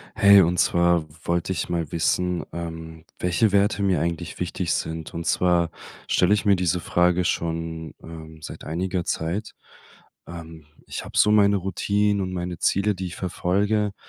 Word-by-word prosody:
Hey, 100 -3 +7
und 90 0 +1
zwar 85 -2 +3 0.2
wollte 85 +2 0
ich 90 - -3
mal 85 -3 -2
wissen, 90 +1 0
ähm, 80 -1 -7
welche 90 +5 +2
Werte 100 +1 +2
mir 95 -5 +2
eigentlich 85 0 -3
wichtig 90 -1 -2
sind? 80 -1 -4
Und 85 0 -5
zwar 85 -2 +2 0.4
stelle 90 +3 +3
ich 105 - 0
mir 100 -1 +5
diese 90 -1 0
Frage 90 +1 +2
schon, 80 -1 -3
ähm, 80 -1 -11
seit - - -9
einiger 90 +2 -2
Zeit. 90 +7 -3 0.7
Ähm, 80 -2 -10 0.2
ich - - -6
habe - - -7
so 105 - +5
meine 100 -1 +5
Routinen 100 +2 0
und 95 -1 -3
meine 90 -1 -4
Ziele, 100 +1 +1
die 95 0 -4
ich 85 - -8
verfolge, 100 +3 0
90 Hz, 160 wpm, -24 LUFS, 85-100 Hz, 0.7 s, Hey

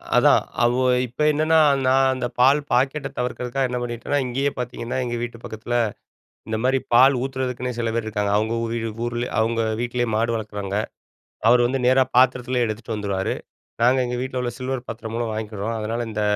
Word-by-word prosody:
அதான் - - +5 0.2
அவு 120 +1 +3 0.3
இப்ப 125 +4 -8
என்னன்னா, 155 +2 +3 0.3
நான் 135 0 +4
அந்த 130 -1 -3
பால் 135 +4 +6
பாக்கெட்ட 135 +3 +1
தவிர்க்கிறதுக்காக 125 +1 -1
என்ன 125 - -2
பண்ணிட்டேன்னா, 120 +4 -2
இங்கேயே 135 +3 0
பாத்தீங்கன்னா, 120 0 -4
எங்க 120 -1 -3
வீட்டு 120 -1 -5
பக்கத்தில, 115 +1 -5 0.7
இந்த 110 - -1
மாரி 130 +1 +3
பால் 130 +3 +7
ஊத்துறதுக்குன்னே 125 -2 -3
சில 115 -1 0
பேர் 115 -1 -1
இருக்காங்க. 105 -2 -1
அவுங்க 110 +2 0
ஊதி 115 +1 -2
டு 115 - -2 0.2
ஊர்லே, 120 +1 -2
அவுங்க 115 0 +1 0.2
வீட்டிலயே 120 0 -1
மாடு 115 +1 +1
வளக்குறாங்க. 105 -2 -4 0.7
அவரு 120 +1 +6
வந்து 130 0 -1
நேரா 130 +1 +5
பாத்திரத்திலயே 125 -1 +3
எடுத்துட்டு 110 +1 -4
வந்துருவாரு. 100 -2 -2 0.5
நாங்க 125 +2 +4
எங்க 125 0 -3
வீட்ல 130 0 -3
உள்ள 120 -1 -2
சில்வர் 130 -1 -4
பாத்திரம் 110 0 -6
மூலம் 115 -1 -1
வாங்கிக்கிறோம். 110 0 -4
அதனால 115 +2 -2
இந்த 105 0 -2
120 Hz, 170 wpm, -23 LUFS, 115-130 Hz, 0.7 s, பால்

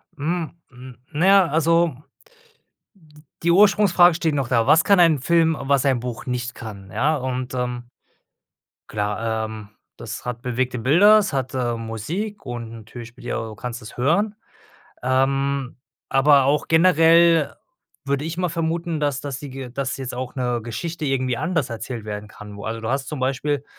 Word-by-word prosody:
Hm, 160 +3 -2 0.2
hm, 125 -1 -13
naja, 190 +5 +5
also 165 0 +2 1.5
die 170 - +2
Ursprungsfrage 190 -2 +5
steht 160 -2 0
noch 135 -4 -1
da. 115 -3 +2
Was 160 +1 +5
kann 200 -2 +5
ein 165 -4 +5
Film, 165 +3 +2
was 140 0 +1
ein 130 -3 +2
Buch 120 -1 -6
nicht 125 -1 -3
kann, 100 -5 -9
ja 140 +10 +1
und, 130 -2 -4
ähm, 125 -1 -3 1.0
klar, 110 +2 -2
ähm, 110 -2 -8 0.3
das - - -7
hat 120 -1 -4
bewegte 125 0 -2
Bilder, 180 - +6
es 210 -7 0
hat, 130 -1 -2
ähm, 120 -3 -2
Musik 175 - -5
und 120 -2 -6
natürlich 115 +1 -10
spielt 120 +1 -13
ja - - -2
du 110 -1 -8
kannst 120 +2 -6
es 110 - -11
hören, 200 - +1 0.7
ähm, 135 +1 0 0.3
aber 135 0 +5
auch 145 +3 +1
generell 165 -1 +5 0.5
würde 140 +1 -1
ich 165 +1 -4
mal 180 0 0
vermuten, 165 0 -2
dass 145 -2 0
dass 140 -2 -5
die 145 -1 -8
Ge 130 -1 -7
dass 130 +1 -3
jetzt 130 -2 -6
auch 125 0 -5
'ne 125 -2 -1
Geschichte 155 +9 -5
irgendwie 130 -3 0
anders 165 -3 -1
erzählt 115 0 -6
werden 105 0 -6
kann. 105 -1 -11
Wo 100 - -9
also 115 +1 -4
du 110 - -4
hast 135 +2 -1
zum 150 -4 -5
Beispiel 135 +2 -1
135 Hz, 170 wpm, -22 LUFS, 120-160 Hz, 1.5 s, Bilder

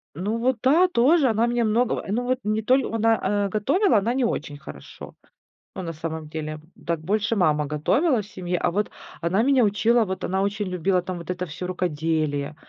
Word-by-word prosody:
Ну 205 +7 -2
вот 250 +1 +1
да, 320 +8 +5
тоже 290 -1 +3
она 225 +2 +2
меня 240 -1 +1
многого, 230 +3 +1
ну 240 +4 0
вот 255 +1 0
не 215 +1 0
толь 260 +4 +3
она, 225 0 +2 0.3
э, - - -2
готовила, 270 - +2
она 225 +5 +1
не 260 -1 0
очень 150 -10 -2
хорошо. - - -11 0.6
Ну - - -4
на 165 -2 -5
самом 160 -1 -6
деле, 155 -1 -5 0.3
так 170 -1 -1
больше 210 +6 0
мама 150 -6 +2
готовила 220 - +1
в 200 - -11
семье, 180 -2 -3
а 175 - +1
вот 205 +4 -1 0.3
она 180 +6 +1
меня 265 0 +4
учила 225 +3 +3
вот 190 -1 -5
она 190 +1 0
очень 200 0 -2
любила 180 +1 0
там 185 0 -5
вот 170 +1 -5
это 180 0 -3
всё 160 +3 -6
рукоделие. 155 -4 -1
200 Hz, 200 wpm, -24 LUFS, 170-235 Hz, 0.6 s, да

